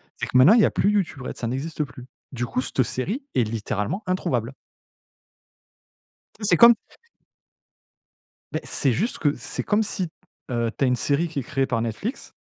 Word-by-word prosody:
c'est - - -3
que - - -9
maintenant, 130 +11 +8
il 235 - +6
y - - +6
a - - +1
plus 200 - +2
YouTube 190 -9 0
Red, 125 - -6
ça 120 - -4
n'existe 145 +6 -2
plus. 125 -3 -11 0.2
Du 125 -1 -3
coup, 125 - -1
cette 130 - -1
série 190 - -2
est 125 - +4
littéralement 110 - -2
introuvable. 135 -9 -1 1.8
Tu 215 - -12
sais, - - 0
c'est - - +5
comme 235 0 +9 1.8
Beh, - - -2
c'est 135 -4 +1
juste 220 - -1
que 145 -2 +1
c'est - - -4
comme 210 +2 +2
si, 190 -3 -2 0.4
heu, 115 -1 0
tu 140 - +2
as - - +2
une 125 - +3
série 145 +7 +1
qui 160 -3 -4
est - - -4
créée 135 +2 0
par 115 -4 -1
Netflix. 115 - -4
135 Hz, 190 wpm, -24 LUFS, 125-190 Hz, 1.8 s, comme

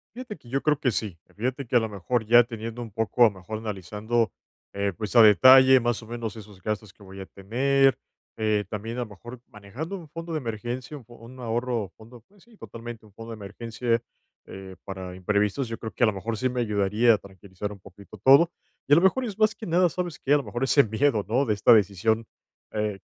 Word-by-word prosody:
Fíjate 240 -5 -8
que 120 -4 -18
yo 135 +2 -1
creo 150 -2 +1
que 130 - +1
sí. 100 -7 -4
Y - - -24
fíjate 130 +4 -3
que 125 - -3
a 120 - +7
lo 110 - -2
mejor 110 +4 -2
ya 120 +2 +7
teniendo 115 0 -7
un 115 - -8
poco 110 +3 -2
a - - +11
lo 110 - +3
mejor 110 +4 -7
analizando, 110 +2 -2 0.4
eh, 100 0 -1
pues 105 +1 -5
a 120 - +9
detalle 130 +5 +8
más 120 -1 -1
o 110 - -13
menos 115 -2 -5
esos 105 -3 -13
gastos 105 -1 -4
que 105 - -19
voy 95 0 -11
a - - -7
tener, 135 +7 +1 0.4
eh, 110 -2 0
también 110 +2 -5
a - - -1
lo 120 - -2
mejor, 120 +4 -11
manejando 120 - -7
un 170 -4 -12
fondo 165 +2 -7
de 155 - -1
emergencia, 120 +3 -5
un 125 - -14
fo 120 - -15
un 120 +3 -13
ahorro, 120 -3 -2
fondo 115 +2 -15
pues 200 -1 -24
sí, 235 -2 -22
totalmente 115 - -9
un 105 - -20
fondo 115 +2 -10
de - - -6
emergencia, 115 +3 -3 0.4
eh, 95 -1 -10
para 95 -2 -7
imprevistos, 105 +7 0
yo 115 - -5
creo 110 - -7
que - - -1
a - - +6
lo 110 - +1
mejor 110 +4 -4
sí 130 +2 0
me 125 0 -2
ayudaría 105 +2 +2
a 105 - +1
tranquilizar 95 +1 -8
un 100 - -11
poquito 100 +3 -14
todo. 140 - +6 0.4
Y 145 - +4
a - - +9
lo 170 - +5
mejor 250 +7 +3
es 210 -3 -6
más 215 0 +3
que 220 - -9
nada, 175 +2 +3
¿sabes 175 -1 -4
qué? 140 - +1
A 145 - +6
lo 140 - -3
mejor 120 +4 -4
ese 140 +2 +5
miedo, 110 -1 +1
¿no? 125 +6 +1
De 110 - +1
esta 100 - +4
decisión, 110 +2 +2 0.5
eh, 105 -1 -1
115 Hz, 240 wpm, -25 LUFS, 105-130 Hz, 0.5 s, a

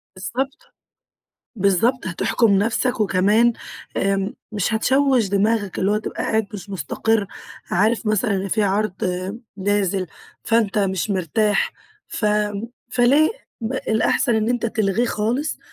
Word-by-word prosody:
بالضبط، 240 +9 -5 0.8
بالضبط، 205 +6 +2
هتحكم 200 +5 +1
نفسك، 230 +3 0
وكمان 210 +4 +3 0.4
امم، 195 +1 0 0.2
مش 210 +2 0
هتشوّش 260 -1 +3
دماغك، 205 0 0
اللي 195 - +1
هو 210 - +2
تبقى - - -5
قاعد 220 -2 0
مش 200 0 -8
مستقر، 200 +5 0 0.4
عارف 215 +5 +1
مثلًا 215 +2 +1
إن 195 +1 -3
في 215 +3 +1
عرض 200 0 +1 0.6
نازل، 195 -1 0 0.4
فأنت 225 -2 +2
مش 195 0 0
مرتاح، 200 +3 +1 0.4
ف 215 - -2 0.6
فليه؟ 275 +6 +4 0.3
م 225 +3 -3
الأحسن 225 0 +1
إن 220 +1 +1
أنت 245 -1 0
تلغيه 220 0 0
خالص، 235 +8 -1
215 Hz, 120 wpm, -21 LUFS, 195-230 Hz, 0.8 s, فليه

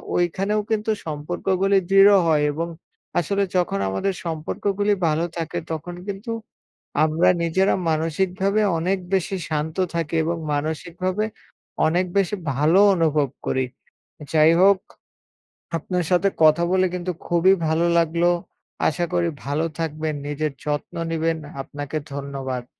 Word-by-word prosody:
ঐখানেও 195 +5 +1
কিন্তু 220 0 +1
সম্পর্কগুলি 180 +6 0
দৃঢ় 195 +1 +7
হয় 155 -2 +3
এবং 165 +3 -3 0.5
আসলে 200 +4 0
যখন 175 - 0
আমাদের 95 - -1
সম্পর্কগুলি 195 +5 -1
ভালো 160 +2 +1
থাকে, 165 +1 -3
তখন 165 +3 -5
কিন্তু 200 +4 -5 0.7
আমরা 160 +2 +3
নিজেরা 190 +4 +2
মানসিকভাবে 185 +6 0 0.2
অনেক 185 +3 0
বেশি 195 +1 0
শান্ত 155 +2 -2 0.2
থাকি, 165 -1 -2
এবং 170 +1 -1 0.2
মানসিকভাবে 175 +7 -2 0.6
অনেক 175 +3 +1
বেশি 200 +1 +2 0.2
ভালো 155 +7 +4 0.2
অনুভব 155 -4 +2 0.2
করি। 130 0 +1 0.7
যাই 155 +1 +6
হোক 195 0 +6 1.0
আপনার 180 +1 -2
সাথে 180 +2 +4
কথা 155 +2 +5
বলে 185 0 +4
কিন্তু 180 0 -2 0.2
খুবই 175 +2 +4
ভালো 160 +2 +2
লাগলো। 170 +1 +2 0.6
আশা 175 +3 0
করি 175 -1 +2 0.2
ভালো 145 +3 0
থাকবেন, 155 -1 -2
নিজের 150 +1 -2
যত্ন 145 -1 -3 0.2
নিবেন, 165 0 0 0.3
আপনাকে 145 +2 -5 0.2
ধন্যবাদ। 135 -3 -4
170 Hz, 125 wpm, -23 LUFS, 155-190 Hz, 1.0 s, দৃঢ়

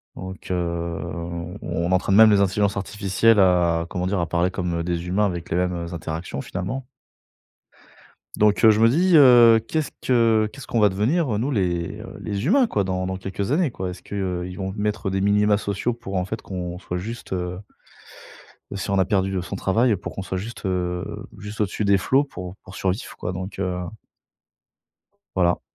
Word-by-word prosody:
Donc, 95 0 -8
heu, - - +2
on 85 +1 -4
on 85 -1 -2
on 90 - -1
entraîne 95 +1 +2
même 110 +1 +8
les 100 -1 +4
intelligences 100 +1 +1
artificielles 100 +2 +2
à, 90 -3 +3
comment 90 0 -2
dire, 100 0 0
à 85 - -1
parler 85 +2 +1
comme, 90 -2 -2
heu, - - -1
des 85 0 -3
humains 100 +4 +2
avec 85 -4 -3
les - - +1
mêmes, 90 0 +1 0.2
heu, 85 - -8
interactions 80 -3 -5
finalement. 125 - -4 1.5
Donc, 105 +1 +3
heu, 110 - +9
je 105 - +1
me 115 - +6
dis, 170 +7 +4
heu, 120 -5 +8
qu'est-ce 155 -2 -1
que 115 -3 +3
qu'est-ce 140 -2 -10
qu'on 115 - -1
va 105 - +6
devenir, 115 - +1
heu, - - 0
nous 125 +7 -1
les, 90 -7 -1
heu, - - -9
les 100 +2 -3
humains 250 - +4
quoi, 105 - -1
dans 95 -1 -2
dans 95 0 -3
quelques 95 +3 -4
années, 160 -1 +2
quoi? 95 -4 -4
Est-ce 90 - -8
qu'ils 90 -2 -4
vont 95 -1 -4
mettre 105 0 -1
des 95 0 -1
minima 105 +1 +3
sociaux 100 +3 -2
pour 115 -5 -7
en 90 - +1
fait 105 +4 -5
qu'on 90 -2 -5
soit 90 - -4
juste, 110 +3 -6
heu, 90 0 -3 1.2
si 95 - -4
on 100 - +2
a - - +4
perdu, 95 -1 0
heu, 90 - -1
son 100 - -5
travail 110 +4 +2
pour - - -7
qu'on 95 - -4
soit 95 0 -3
juste, 110 +5 -7
heu, 90 -1 -3
juste 105 +1 -8
au-dessus 105 +1 -1
des 100 -1 +4
flots 130 +8 +3
pour 90 -10 -8
pour 90 +1 -11
survivre 95 +6 -2
quoi 90 - -4
donc, 95 +2 -6
heu. 90 -2 -1 1.6
Voilà. 90 -2 +2
95 Hz, 200 wpm, -23 LUFS, 90-110 Hz, 1.6 s, heu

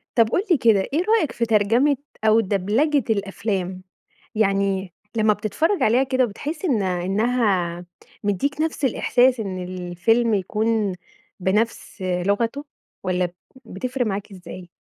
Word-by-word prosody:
طب 230 -2 +4
قُل 365 - +1
لي 335 - +6
كده، 225 -6 +4
إيه 330 +5 +2
رأيك 310 - 0
في 235 - -1
ترجمة 230 +6 +3 0.3
أو 220 +1 +5
دبلجة 225 +9 +1
الأفلام؟ 195 -3 -2 0.5
يعني 195 -3 +1 0.2
لمّا 215 -1 +4
بتتفرج 270 - 0
عليها 240 +5 +4
كده 260 -1 +2
بتحس 290 - -5
إن 255 - +2
إنها 190 -1 0 0.4
مدّيك 275 +9 -1
نفس 315 -2 -1
الإحساس 250 0 +3
إن 190 -4 -4
الفيلم 185 +6 0
يكون 210 0 0 0.4
بنفس 210 +2 -1
لغته 200 +9 -1 0.4
والّا 180 -1 0 0.4
بتفرق 250 +5 -3
معاك 205 0 -3
إزاي؟ 180 -1 -10
215 Hz, 125 wpm, -22 LUFS, 190-245 Hz, 0.5 s, لي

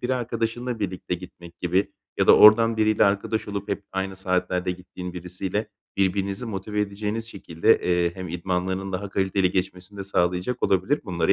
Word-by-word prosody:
bir 125 - -2
arkadaşınla 120 -1 -2
birlikte 95 -3 -3
gitmek 85 -1 -11
gibi 95 +3 +1 0.3
ya - - +3
da - - +8
oradan 115 +1 +7
biriyle 110 -1 +3
arkadaş 100 +2 0
olup 100 -1 -4
hep 100 0 -3
aynı 95 0 -3
saatlerde 90 -1 0
gittiğin 90 0 -7
birisiyle 90 +4 -4 0.3
birbirinizi 100 +3 0
motive 105 0 -3
edeceğiniz 105 +2 -2
şekilde, 85 -6 +2
eee, 85 -1 +1
hem 95 -2 -6
idmanlarının 95 +2 -2
daha 100 +2 -3
kaliteli 95 -1 +1
geçmesini 95 +2 -3
de 100 - -4
sağlayacak 90 +5 0
olabilir, 95 +11 +2
bunları 85 -2 +1
95 Hz, 160 wpm, -25 LUFS, 90-105 Hz, 0.3 s, da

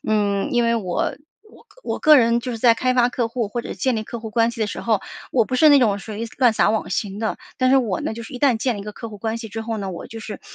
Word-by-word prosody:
嗯， 205 -2 0
因 240 -1 +3
为 235 0 +2
我 185 -6 -2 0.3
我 - - -19 0.2
我 - - -2
个 305 -1 +7
人 235 -2 +3
就 250 - -5
是 230 - -5
在 230 0 +5
开 255 +2 0
发 245 -1 +4
客 245 -1 -1
户， 230 -2 -2
或 235 +3 -4
者 - - -8
是 - - -6
建 260 -2 0
立 220 - -2
客 235 - -6
户 220 - -7
关 230 +1 +2
系 230 - -9
的 215 - +1
时 - - -5
候， 220 -4 +1 0.3
我 240 -3 +3
不 255 - -4
是 310 +4 +6
那 285 -1 +7
种 215 -5 +3
属 220 - -8
于 220 +3 -4
乱 245 -4 +5
撒 - - +3
网 220 - -1
型 200 -1 -2
的。 220 - -1 0.2
但 255 0 +2
是 270 - +6
我 225 -9 0
呢， - - -3
就 230 - -7
是 - - -11
一 - - -5
旦 260 -3 +3
建 235 +1 -1
立 - - -6
一 - - -7
个 210 +1 -7
客 230 - -8
户 210 - -10
关 220 +2 -3
系 225 -1 -7
之 220 +2 -5
后 225 0 -3
呢， 200 -2 -4
我 170 - -8
就 225 - -8
是 220 -2 -7
230 Hz, 345 characters per minute, -21 LUFS, 215-245 Hz, 0.3 s, 个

